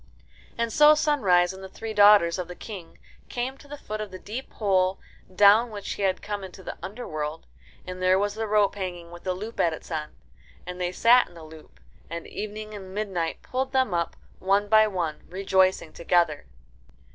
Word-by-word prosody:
And 235 Hz, -1 st, -1 dB
so 300 Hz, 0 st, +7 dB
Sunrise 195 Hz, -, +3 dB
and 190 Hz, 0 st, -11 dB
the 190 Hz, -, -8 dB
three 225 Hz, +3 st, -6 dB
daughters 205 Hz, -4 st, +6 dB
of 180 Hz, -, -4 dB
the 180 Hz, -, -8 dB
King 185 Hz, -6 st, -9 dB, 0.3 s
came 250 Hz, +2 st, -3 dB
to -, -, -16 dB
the 290 Hz, +1 st, -8 dB
foot 215 Hz, -5 st, -6 dB
of 210 Hz, -, -5 dB
the 185 Hz, -, -8 dB
deep 225 Hz, +8 st, -7 dB
hole 190 Hz, -3 st, +1 dB, 0.4 s
down 210 Hz, +5 st, +6 dB
which 205 Hz, -2 st, -6 dB
he -, -, -7 dB
had 190 Hz, -2 st, 0 dB
come 205 Hz, -1 st, -4 dB
into 190 Hz, 0 st, -10 dB
the -, -, -6 dB
underworld. 155 Hz, -8 st, -5 dB, 0.4 s
And 185 Hz, 0 st, -7 dB
there 185 Hz, 0 st, +4 dB
was 205 Hz, +1 st, 0 dB
the 220 Hz, +1 st, -3 dB
rope 210 Hz, -1 st, +3 dB
hanging 175 Hz, -4 st, -6 dB
with 175 Hz, +1 st, -12 dB
the 185 Hz, -1 st, -1 dB
loop 215 Hz, +5 st, -7 dB
at 165 Hz, -, +3 dB
its 160 Hz, -, -10 dB
end. 155 Hz, -1 st, -4 dB, 0.5 s
And 180 Hz, 0 st, -7 dB
they 175 Hz, 0 st, -1 dB
sat 240 Hz, +6 st, +5 dB
in 175 Hz, -, -18 dB
the 165 Hz, -, -11 dB
loop, 155 Hz, 0 st, -14 dB, 0.3 s
and 170 Hz, +1 st, -6 dB
Evening 215 Hz, 0 st, -6 dB
and 190 Hz, -2 st, -9 dB
Midnight 190 Hz, -6 st, -3 dB
pulled 260 Hz, +1 st, -3 dB
them 260 Hz, -7 st, +2 dB
up 170 Hz, -1 st, -1 dB, 0.2 s
one 200 Hz, +2 st, +2 dB
by 215 Hz, 0 st, +6 dB
one, 175 Hz, -6 st, -3 dB
rejoicing 190 Hz, -3 st, +1 dB
together. 170 Hz, -, +1 dB
195 Hz, 195 wpm, -26 LUFS, 175-215 Hz, 0.5 s, so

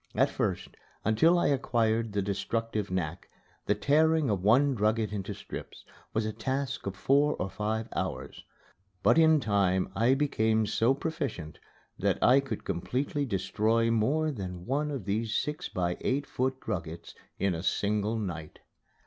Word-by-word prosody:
At -, -, +3 dB
first, -, -, -2 dB, 0.4 s
until 160 Hz, -, +4 dB
I -, -, +2 dB
acquired 115 Hz, -5 st, +1 dB
the 100 Hz, -1 st, 0 dB
destructive 105 Hz, +2 st, -2 dB
knack, 90 Hz, -1 st, -3 dB, 0.4 s
the -, -, +3 dB
tearing 155 Hz, -2 st, +3 dB
of 100 Hz, -3 st, -1 dB
one 130 Hz, +8 st, +4 dB
drugget 110 Hz, -1 st, 0 dB
into 100 Hz, 0 st, -4 dB
strips 100 Hz, -, -9 dB, 0.3 s
was 110 Hz, 0 st, 0 dB
a 110 Hz, -, -2 dB
task 130 Hz, +2 st, -3 dB
of 100 Hz, -, -3 dB
four 140 Hz, +8 st, +3 dB
or 95 Hz, -, -4 dB
five 110 Hz, +1 st, -2 dB
hours. -, -, -4 dB, 0.6 s
But -, -, +5 dB
in 160 Hz, -1 st, +6 dB
time 100 Hz, -5 st, +1 dB
I 120 Hz, +4 st, +3 dB
became 110 Hz, -6 st, +1 dB
so 115 Hz, +5 st, +2 dB
proficient 140 Hz, -, -4 dB, 0.4 s
that -, -, +1 dB
I 130 Hz, +3 st, +6 dB
could 135 Hz, -6 st, -5 dB
completely 130 Hz, -, -2 dB
destroy 115 Hz, +2 st, +1 dB
more 145 Hz, +8 st, +1 dB
than 90 Hz, -7 st, -6 dB
one 145 Hz, +5 st, 0 dB
of 135 Hz, -9 st, -4 dB
these 105 Hz, +2 st, -1 dB
six 150 Hz, 0 st, -2 dB
by 90 Hz, -3 st, -1 dB
eight 140 Hz, +2 st, 0 dB
foot 130 Hz, 0 st, -2 dB
druggets 85 Hz, -5 st, -5 dB, 0.2 s
in 100 Hz, -2 st, +1 dB
a 80 Hz, -, -4 dB
single 105 Hz, +3 st, 0 dB
night. 85 Hz, -7 st, -5 dB
110 Hz, 155 wpm, -29 LUFS, 100-135 Hz, 0.6 s, in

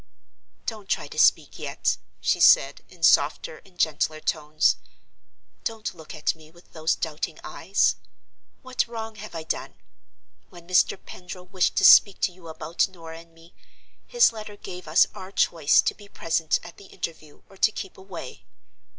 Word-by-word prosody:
"Don't 215 Hz, -4 st, -6 dB
try -, -, -1 dB
to -, -, -7 dB
speak -, -, +3 dB
yet," -, -, -1 dB, 0.2 s
she -, -, +1 dB
said, -, -, +5 dB
in -, -, -16 dB
softer -, -, +3 dB
and 185 Hz, -2 st, -22 dB
gentler 155 Hz, -1 st, 0 dB
tones. 155 Hz, 0 st, +1 dB, 0.9 s
"Don't 225 Hz, -2 st, -4 dB
look 160 Hz, -2 st, -11 dB
at 155 Hz, -, 0 dB
me 155 Hz, -1 st, -18 dB
with 170 Hz, +2 st, -22 dB
those 160 Hz, 0 st, 0 dB
doubting 155 Hz, -1 st, -4 dB
eyes. 195 Hz, +5 st, +1 dB, 0.7 s
What 255 Hz, -1 st, -1 dB
wrong 225 Hz, -1 st, -6 dB
have 215 Hz, -3 st, -9 dB
I 160 Hz, -, -5 dB
done? 160 Hz, -, -4 dB, 0.7 s
When 175 Hz, -2 st, -15 dB
Mr. 185 Hz, +1 st, +3 dB
Pendril 180 Hz, 0 st, -10 dB
wished 185 Hz, -1 st, 0 dB
to -, -, +3 dB
speak 200 Hz, -2 st, +8 dB
to 190 Hz, -, +2 dB
you 175 Hz, -1 st, -15 dB
about 160 Hz, +1 st, -1 dB
Norah 165 Hz, -3 st, -11 dB
and 165 Hz, 0 st, -17 dB
me, 165 Hz, +1 st, -19 dB, 0.5 s
his 480 Hz, -, +4 dB
letter 215 Hz, -1 st, -8 dB
gave 180 Hz, -3 st, -9 dB
us 155 Hz, +3 st, +5 dB
our 185 Hz, +1 st, -9 dB
choice 165 Hz, -6 st, +3 dB
to -, -, 0 dB
be 205 Hz, -1 st, -16 dB
present 165 Hz, -4 st, 0 dB
at 170 Hz, -, -12 dB
the 200 Hz, -, -14 dB
interview, 155 Hz, -5 st, -8 dB
or 195 Hz, -, -18 dB
to 215 Hz, -, +3 dB
keep 195 Hz, -3 st, -7 dB
away. 190 Hz, -8 st, -10 dB
175 Hz, 165 wpm, -25 LUFS, 160-200 Hz, 0.9 s, speak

